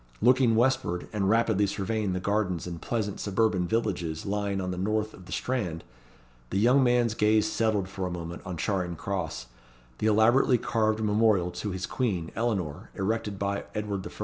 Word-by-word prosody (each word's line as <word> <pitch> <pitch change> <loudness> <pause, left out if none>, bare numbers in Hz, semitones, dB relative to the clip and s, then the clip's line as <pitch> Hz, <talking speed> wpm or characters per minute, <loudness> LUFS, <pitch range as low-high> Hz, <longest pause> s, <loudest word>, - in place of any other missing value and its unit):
Looking 125 0 +4
westward, 115 -7 +1
and 100 -2 +1
rapidly 110 -2 +3
surveying 100 0 -1
the 90 - -1
gardens 95 -3 -1
and 85 -2 -6
pleasant 105 -4 -2
suburban 100 -3 +1
villages 90 -7 -1
lying 100 -1 -1
on 90 -1 -2
the 90 - -4
north 110 +2 -1
of 90 -2 -14
the - - -11
Strand, 95 -11 -2 0.7
the - - -1
young 125 +6 +5
man's 120 -2 +3
gaze 110 -1 +3
settled 110 -4 0
for 95 -1 -4
a - - -4
moment 85 0 -6
on 90 -3 -5
Charing 90 0 -1
Cross 95 -4 -4 0.5
the 110 - +1
elaborately 120 +4 +4
carved 110 -2 0
memorial 105 -4 +3
to 105 +4 -4
his 95 -1 -3
Queen, 95 -10 -2
Eleanor, 95 -11 -2
erected 105 +1 -2
by 100 0 -2
Edward 105 -2 -3
I. - - -10
105 Hz, 175 wpm, -28 LUFS, 95-110 Hz, 0.7 s, young